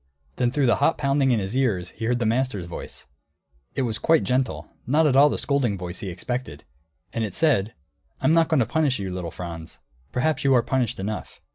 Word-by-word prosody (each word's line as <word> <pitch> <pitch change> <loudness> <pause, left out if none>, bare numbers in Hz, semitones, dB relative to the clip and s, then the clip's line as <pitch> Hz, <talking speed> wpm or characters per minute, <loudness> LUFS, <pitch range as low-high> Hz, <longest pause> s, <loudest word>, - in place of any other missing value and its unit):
Then 120 - +2
through 140 +2 +1
the 120 - +3
hot 150 +4 +2
pounding 140 -1 +2
in 120 -3 +3
his 95 +4 -4
ears 100 -9 0
he 115 - -6
heard 120 +1 +1
the 120 - -1
master's 115 -5 0
voice; 85 -5 -8 0.7
it 135 - 0
was 115 -3 -1
quite 165 -1 +3
gentle; 130 +1 -1 0.2
not 155 +5 +3
at 140 -3 +3
all 145 +2 +7
the - - -2
scolding 130 -8 0
voice 90 0 -6
he 100 - -4
expected. 90 - -5 0.5
And 115 - -1
it 105 -4 -4
said, 125 -10 +2 0.4
"I'm - - +2
not 165 0 +4
going 155 -5 +2
to - - +2
punish 155 -3 +1
you, 95 -2 -4
little 90 -2 -4
Franz. 85 -2 -8 0.3
Perhaps 150 +3 0
you 135 -1 +4
are 120 - +4
punished 125 -4 -1
enough. 105 +3 -5
125 Hz, 215 wpm, -24 LUFS, 100-140 Hz, 0.7 s, all